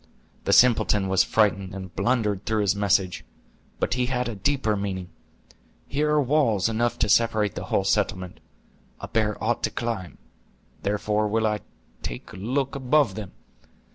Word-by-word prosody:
"The - - +1
simpleton 105 -5 +4
was 95 0 +4
frightened, 100 -3 +1
and 95 -2 -8
blundered 105 -2 0
through 110 -1 +1
his 100 -1 +2
message; 100 -2 +1 0.6
but - - 0
he 125 0 0
had 125 -1 -1
a 120 - -3
deeper 110 +1 0
meaning. 95 -3 -4 0.8
Here 150 +2 0
are 150 -1 +3
walls 120 -8 +2
enough 115 +1 0
to 110 - +1
separate 110 -1 +2
the - - -6
whole - - +1
settlement. 90 -1 -1 0.6
A - - -6
bear 110 -2 0
ought 120 +2 0
to - - +1
climb; 110 -9 -4 0.6
therefore 105 +1 0
will 110 +1 +1
I 105 -1 0 0.4
take - - -7
a - - -9
look 130 +7 -1
above 140 +2 +2
them. 105 -4 -7
110 Hz, 160 wpm, -25 LUFS, 100-120 Hz, 0.8 s, simpleton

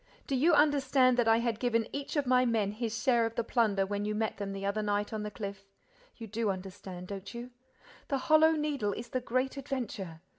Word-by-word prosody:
Do 275 - -1
you 315 +7 +4
understand 275 -4 +4
that 240 -2 +2
I 225 0 +6
had 235 -1 -1
given 230 -2 +1
each 280 +2 -4
of 290 -2 +1
my 255 0 +4
men 225 -5 +1
his 225 +1 -3
share 240 -3 +4
of 225 - -9
the 235 - 0
plunder 215 -5 +2
when 205 +1 -2
you 210 0 -1
met 220 0 -1
them 200 -1 -4
the 195 0 -5
other 200 +2 0
night 205 0 -1
on 215 - -2
the 210 - -3
cliff? 200 -1 -7 0.5
You 230 - -7
do 220 0 -1
understand, 185 -1 -6
don't 195 -1 -6
you? 240 +1 -7 0.6
The 275 - 0
Hollow 310 +4 +5
Needle 290 -9 -1
is 235 +3 -7
the 255 - -2
great 255 +3 -1
adventure. 220 - -5
230 Hz, 220 wpm, -31 LUFS, 205-255 Hz, 0.6 s, I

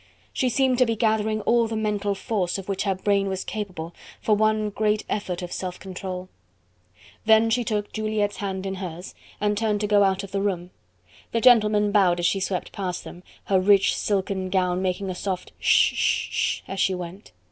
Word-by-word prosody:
She 255 - +1
seemed 260 0 +2
to 255 - +6
be 230 - 0
gathering 215 -1 +1
all 235 +1 +3
the 225 - -4
mental 205 -2 -1
force 195 -4 -1
of 195 - -8
which 195 0 -2
her 195 -1 +1
brain 200 +1 +1
was 190 0 -3
capable, 185 -6 -5 0.3
for 215 - +2
one 215 0 +1
great 210 +1 0
effort 185 -3 -3
of 175 - -6
self 180 -1 -5
control. 185 -1 -6 1.0
Then 220 +1 +5
she 245 +2 +2
took 210 -2 -2
Juliette's 215 -1 -1
hand 195 -1 -4
in 190 - -2
hers, 180 -1 -7 0.3
and 210 0 +1
turned 210 -1 0
to - - +1
go 205 -1 +4
out 195 0 +1
of 200 - -9
the 195 0 -1
room; 180 -3 -2 0.6
the 230 - +2
gentlemen 210 -3 +5
bowed 190 -4 +4
as 175 - 0
she 195 +3 +2
swept 185 -1 -3
past 185 -3 -4
them, 175 - -10 0.2
her 190 -1 +2
rich 195 +1 +4
silken 190 -2 -1
gown 185 -1 +1
making 190 +1 -1
a - - -3
soft 185 0 -4
hush - - +4
sh - - +1
sh - - 0
as 195 - -5
she 190 - +2
went. 180 +3 -8
200 Hz, 200 wpm, -24 LUFS, 185-215 Hz, 1.0 s, to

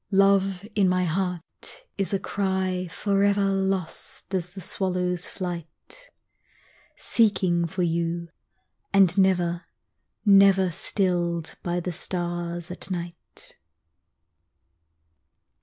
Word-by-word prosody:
Love 195 0 +3
in 200 -3 +3
my 185 0 +2
heart 180 - -3
is 195 -2 -1
a 200 - +2
cry 190 -2 -1
forever 200 +2 +2
Lost 195 -1 -2
as 180 -2 -1
the 185 +2 -10
swallow's 180 -1 -2
flight, 180 - -7 0.9
Seeking 185 -6 +2
for 180 +2 -2
you 170 0 -1 0.6
and 195 -3 +5
never, 180 -3 +2 0.6
never 195 -2 +6
Stilled 175 -2 0
by 175 0 -1
the 175 0 -4
stars 175 0 -3
at 180 - -5
night. 175 -2 -7
185 Hz, 95 wpm, -25 LUFS, 175-195 Hz, 0.9 s, never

